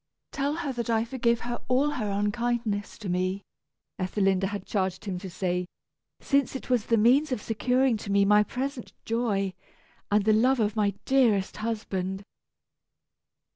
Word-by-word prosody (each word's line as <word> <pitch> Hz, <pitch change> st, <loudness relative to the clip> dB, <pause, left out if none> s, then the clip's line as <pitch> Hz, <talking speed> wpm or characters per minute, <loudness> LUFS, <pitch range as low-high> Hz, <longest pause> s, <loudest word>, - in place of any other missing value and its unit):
"Tell 285 Hz, +1 st, -1 dB
her 310 Hz, -5 st, -3 dB
that 235 Hz, -1 st, -4 dB
I 225 Hz, 0 st, +2 dB
forgive 235 Hz, -1 st, 0 dB
her 240 Hz, 0 st, -4 dB
all 270 Hz, +4 st, +2 dB
her 230 Hz, -8 st, -2 dB
unkindness 210 Hz, +1 st, -1 dB
to 210 Hz, -, -7 dB
me," 185 Hz, +2 st, -1 dB, 0.6 s
Ethelinda 195 Hz, 0 st, +1 dB
had 200 Hz, -1 st, -5 dB
charged 190 Hz, -1 st, -2 dB
him 185 Hz, -3 st, -3 dB
to 190 Hz, 0 st, -7 dB
say, 180 Hz, 0 st, -2 dB, 0.5 s
"since 275 Hz, -1 st, +1 dB
it 265 Hz, -, -6 dB
was 240 Hz, -4 st, +2 dB
the 230 Hz, -, +3 dB
means 260 Hz, +7 st, +4 dB
of 255 Hz, -, 0 dB
securing 250 Hz, +3 st, +1 dB
to 205 Hz, -1 st, -6 dB
me 200 Hz, 0 st, +4 dB
my 210 Hz, +1 st, +6 dB
present 255 Hz, +3 st, -4 dB
joy, 210 Hz, -5 st, 0 dB, 0.6 s
and 205 Hz, -1 st, +2 dB
the 215 Hz, -, +5 dB
love 250 Hz, +4 st, +3 dB
of 210 Hz, -1 st, +1 dB
my 205 Hz, -2 st, +1 dB
dearest 230 Hz, -8 st, +2 dB
husband." 200 Hz, -4 st, -3 dB
215 Hz, 160 wpm, -27 LUFS, 200-245 Hz, 0.6 s, my